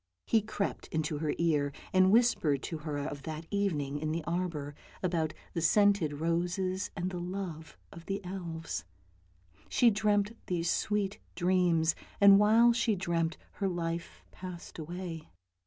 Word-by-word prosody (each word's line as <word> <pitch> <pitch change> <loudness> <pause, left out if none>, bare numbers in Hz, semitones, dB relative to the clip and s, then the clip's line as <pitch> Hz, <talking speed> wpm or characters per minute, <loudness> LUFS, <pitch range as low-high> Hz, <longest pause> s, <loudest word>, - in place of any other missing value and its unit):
He 225 - +3
crept 210 -1 -3
into 155 -1 -2
her 155 -1 -1
ear, 150 -4 +2 0.2
and 185 0 +6
whispered 205 - +3
to 160 - -4
her 150 -1 -4
of 145 0 -4
that 155 +2 -6
evening 150 -9 0
in 155 +1 -2
the 165 0 -2
arbour, 170 -4 -2 0.3
about 165 -4 0 0.2
the 170 - -1
scented 200 -2 +4
roses, 175 +5 -1
and 180 +1 -2
the 180 - -4
love 175 -3 -5
of 170 0 -12
the 195 0 -1
elves. 170 - -5 0.9
She 240 -2 +5
dreamt 210 +1 +1
these 175 -2 0
sweet 205 -2 0 0.2
dreams, 175 -3 +3 0.3
and 200 -1 +8
while 225 +3 +6
she 230 -2 +1
dreamt 170 -3 -1
her 200 - -2
life 170 -2 -4
passed 180 -2 -9
away. 170 0 -6
175 Hz, 145 wpm, -31 LUFS, 160-195 Hz, 0.9 s, and